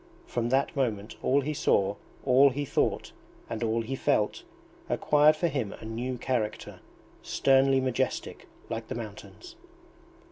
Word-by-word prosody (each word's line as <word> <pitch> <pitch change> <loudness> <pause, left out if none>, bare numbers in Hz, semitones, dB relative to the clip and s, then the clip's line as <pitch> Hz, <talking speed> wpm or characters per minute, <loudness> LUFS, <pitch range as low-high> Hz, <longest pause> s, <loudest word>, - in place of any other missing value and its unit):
From 120 -1 -2
that 135 +5 +1
moment 110 -6 -2
all 140 +2 +3
he 150 +3 -2
saw, 100 -8 +2 0.3
all 135 +2 +6
he 145 +2 -3
thought, - - 0 0.4
and 115 - -5
all 115 0 0
he 130 +4 -4
felt, 105 -4 +1 0.5
acquired 150 +1 +4
for 170 +3 0
him 130 -10 -2
a - - -11
new 120 +3 -4
character, 115 -4 -3 0.4
sternly 135 0 +3
majestic 130 -2 -2 0.2
like 115 -1 -5
the - - -5
mountains! 120 - -9
130 Hz, 140 wpm, -28 LUFS, 115-140 Hz, 0.5 s, all